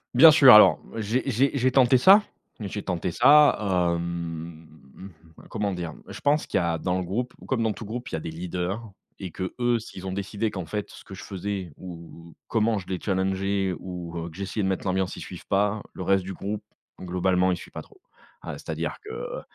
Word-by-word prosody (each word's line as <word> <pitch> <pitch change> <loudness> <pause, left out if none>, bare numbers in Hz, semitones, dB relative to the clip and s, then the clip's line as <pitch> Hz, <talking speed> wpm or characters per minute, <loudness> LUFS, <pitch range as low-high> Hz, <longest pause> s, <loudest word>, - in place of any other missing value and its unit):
Bien 160 -1 +10
sûr 140 -5 +8
alors 95 -8 +8 0.2
j'ai 115 +5 -1
j'ai 130 +3 +2
j'ai 130 0 +2
tenté 130 -1 +5
ça. 195 - +7 0.4
J'ai 105 0 -4
tenté 90 -1 -2
ça, 145 - +6 0.4
hem, 85 -1 -6 0.8
comment 105 -3 -2
dire, 85 -3 -5
je - - -9
pense 150 +2 +2
qu'il - - 0
y 95 - +2
a 85 -1 0
dans 90 +2 -1
le 95 - -2
groupe, 120 +8 -3
comme 130 -4 0
dans 110 -1 +1
tout 115 - -9
groupe, 120 +4 -6
il - - -9
y - - +1
a 80 - -4
des 80 - -6
leaders 90 +5 -4 0.4
et 95 -4 -6
que 95 +1 -5
eux, 120 -1 +2
s'ils 95 -4 -9
ont 95 - -3
décidé 100 +3 -3
qu'en 95 -4 -5
fait 105 +2 -4
ce - - -13
que - - -12
je - - -10
faisais 95 -3 -5
ou 85 -2 -11
ou - - -18
comment 115 -1 +1
je 95 - -12
les 95 - -2
challengeais 95 0 -1
ou 90 -2 -7
heu, 85 0 -4
que 80 - -14
j'essayais 100 +2 -3
de 95 - +1
mettre 95 +1 -2
l'ambiance, 95 0 -1
ils - - -7
suivent - - -10
pas, 100 +2 +1
le 95 - -6
reste 95 +1 +2
du 95 - -6
groupe 100 +3 -5 0.4
globalement, 90 0 +1
il 90 - -1
suit - - -12
pas - - -7
trop. 420 - -20 0.4
Ah, - - -6
c'est-à-dire - - -4
que, 420 - -10
heu, - - -6
95 Hz, 220 wpm, -25 LUFS, 90-115 Hz, 0.8 s, Bien